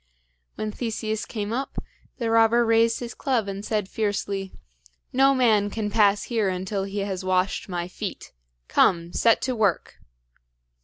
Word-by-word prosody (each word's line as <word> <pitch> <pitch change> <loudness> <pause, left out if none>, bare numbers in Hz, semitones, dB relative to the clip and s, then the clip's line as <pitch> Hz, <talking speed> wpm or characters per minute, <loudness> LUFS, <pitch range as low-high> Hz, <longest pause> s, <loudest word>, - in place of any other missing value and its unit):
When 215 0 -3
Theseus 220 -1 -3
came 210 -1 -4
up, 270 +3 -4 0.4
the 230 -3 -1
robber 230 +1 +4
raised 230 +1 +3
his 235 -2 -5
club, 245 -7 -1
and 195 0 -5
said 210 -3 -1
fiercely: 200 -2 -2 0.6
"No 270 +1 +4
man 220 -5 +3
can 210 0 -3
pass 205 -2 +3
here 225 -5 0
until 190 +2 -2
he 200 +1 -3
has 190 -2 -4
washed 185 +2 0
my 175 -1 -3
feet! 180 - -7 0.3
Come, 170 -1 +2
set 230 -1 +3
to 255 -1 -1
work!" 205 -6 0
210 Hz, 150 wpm, -25 LUFS, 195-230 Hz, 0.6 s, robber